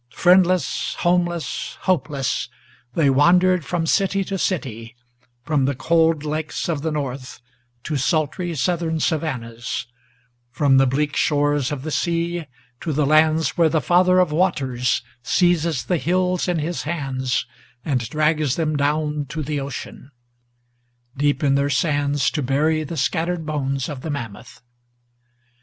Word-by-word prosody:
Friendless, 180 Hz, 0 st, +3 dB
homeless, 175 Hz, -1 st, -1 dB
hopeless, 145 Hz, -7 st, -1 dB, 0.5 s
they 155 Hz, -4 st, +3 dB
wandered 180 Hz, +5 st, +4 dB
from 170 Hz, +2 st, -2 dB
city 195 Hz, +3 st, +1 dB
to 195 Hz, +1 st, -4 dB
city, 125 Hz, -, -3 dB, 0.5 s
From 145 Hz, -1 st, +1 dB
the 140 Hz, 0 st, 0 dB
cold 160 Hz, +1 st, +2 dB
lakes 155 Hz, 0 st, -3 dB
of 160 Hz, -4 st, -1 dB
the 160 Hz, -, -1 dB
North 135 Hz, -5 st, -4 dB, 0.4 s
to 150 Hz, -, -2 dB
sultry 155 Hz, +5 st, -1 dB
Southern 160 Hz, +3 st, 0 dB
savannas, 125 Hz, -10 st, -2 dB, 0.6 s
From 135 Hz, +2 st, +3 dB
the 135 Hz, 0 st, +5 dB
bleak 145 Hz, +3 st, 0 dB
shores 145 Hz, -2 st, +1 dB
of 140 Hz, -3 st, -4 dB
the 155 Hz, -, -4 dB
sea 170 Hz, 0 st, -1 dB, 0.3 s
to 160 Hz, -, -3 dB
the 150 Hz, +1 st, +1 dB
lands 155 Hz, +1 st, +3 dB
where 165 Hz, -1 st, +5 dB
the 160 Hz, -, +1 dB
Father 180 Hz, +5 st, +3 dB
of 180 Hz, -4 st, +3 dB
Waters 135 Hz, -9 st, 0 dB, 0.2 s
Seizes 170 Hz, 0 st, +1 dB
the 180 Hz, -, +1 dB
hills 180 Hz, +3 st, 0 dB
in 175 Hz, -1 st, 0 dB
his 165 Hz, +3 st, -2 dB
hands, 135 Hz, -5 st, -2 dB, 0.4 s
and 125 Hz, -7 st, -1 dB
drags 155 Hz, -2 st, +1 dB
them 155 Hz, -2 st, -1 dB
down 150 Hz, 0 st, 0 dB
to 155 Hz, -1 st, -4 dB
the 145 Hz, +1 st, -2 dB
ocean, 135 Hz, 0 st, -7 dB, 1.1 s
Deep 145 Hz, +1 st, 0 dB
in 140 Hz, -1 st, +3 dB
their 140 Hz, +1 st, +1 dB
sands 145 Hz, -1 st, +1 dB
to 150 Hz, -, -2 dB
bury 150 Hz, +4 st, +1 dB
the 155 Hz, +2 st, -6 dB
scattered 170 Hz, 0 st, -1 dB
bones 135 Hz, -3 st, -2 dB
of 140 Hz, -4 st, -6 dB
the 160 Hz, -, -5 dB
mammoth. 120 Hz, -4 st, -7 dB
155 Hz, 140 wpm, -22 LUFS, 140-170 Hz, 1.1 s, the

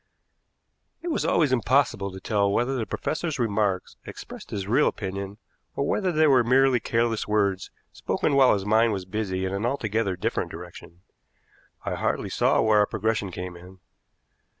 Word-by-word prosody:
It 350 Hz, -, -3 dB
was 315 Hz, -, -1 dB
always 150 Hz, -5 st, +2 dB
impossible 125 Hz, -5 st, +1 dB
to 95 Hz, -, -9 dB
tell 100 Hz, 0 st, +1 dB
whether 125 Hz, +6 st, 0 dB
the 115 Hz, -4 st, -2 dB
professor's 160 Hz, -1 st, -3 dB
remarks 105 Hz, -5 st, -1 dB
expressed -, -, -10 dB
his 100 Hz, -2 st, -4 dB
real 130 Hz, +8 st, +3 dB
opinion, 100 Hz, 0 st, -4 dB, 0.4 s
or 140 Hz, -, -1 dB
whether 190 Hz, +2 st, 0 dB
they 155 Hz, -1 st, +3 dB
were 130 Hz, -5 st, +5 dB
merely 130 Hz, +1 st, +4 dB
careless 115 Hz, -1 st, 0 dB
words 100 Hz, -3 st, 0 dB, 0.2 s
spoken -, -, -1 dB
while 135 Hz, -2 st, +6 dB
his 100 Hz, -1 st, -4 dB
mind 110 Hz, +1 st, +3 dB
was 95 Hz, -2 st, -4 dB
busy 95 Hz, -1 st, -2 dB
in 95 Hz, -, -3 dB
an 100 Hz, +2 st, -2 dB
altogether 110 Hz, -6 st, -1 dB
different 90 Hz, -, -2 dB
direction. 85 Hz, +2 st, -11 dB, 0.8 s
I -, -, -2 dB
hardly -, -, -1 dB
saw -, -, +2 dB
where 110 Hz, -1 st, +4 dB
our 105 Hz, -, +3 dB
progression 105 Hz, -2 st, -1 dB
came 90 Hz, 0 st, -6 dB
in. 90 Hz, +2 st, -14 dB
110 Hz, 165 wpm, -25 LUFS, 95-125 Hz, 0.8 s, while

